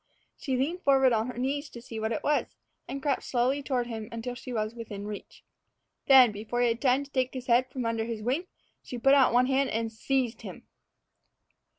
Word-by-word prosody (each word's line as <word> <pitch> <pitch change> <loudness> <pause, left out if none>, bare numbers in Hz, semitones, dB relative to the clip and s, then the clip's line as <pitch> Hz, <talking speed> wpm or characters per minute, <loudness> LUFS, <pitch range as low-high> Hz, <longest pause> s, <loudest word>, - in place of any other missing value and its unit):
She 265 -3 -2
leaned 325 +8 -1
forward 270 -4 +4
on 220 +1 +1
her 250 - -7
knees 280 +4 -2
to 235 - -10
see 230 -2 -8
what 220 +1 -2
it - - -2
was, 295 0 0 0.3
and 275 0 -6
crept 280 -3 +1
slowly 260 +3 0
toward 255 -3 -1
him 225 -2 -6
until 230 +2 -5
she 255 +1 -9
was 215 -1 -2
within 210 -4 -7
reach. 210 -1 -8 0.6
Then, 260 -4 +8
before 215 +4 -3
he 240 - +4
had 230 +1 -2
time 265 +1 +3
to 280 - -15
take 260 -1 -1
his 255 -1 -5
head 250 +1 +3
from 255 -2 -4
under 230 -1 -1
his 225 -2 -5
wing, 275 +10 -1 0.3
she 250 - -7
put 270 +4 +4
out 275 -2 +5
one 245 +1 +4
hand 270 +1 +1
and 225 0 -2
seized 250 +1 -1
him. - - -9
250 Hz, 215 wpm, -28 LUFS, 230-270 Hz, 0.6 s, Then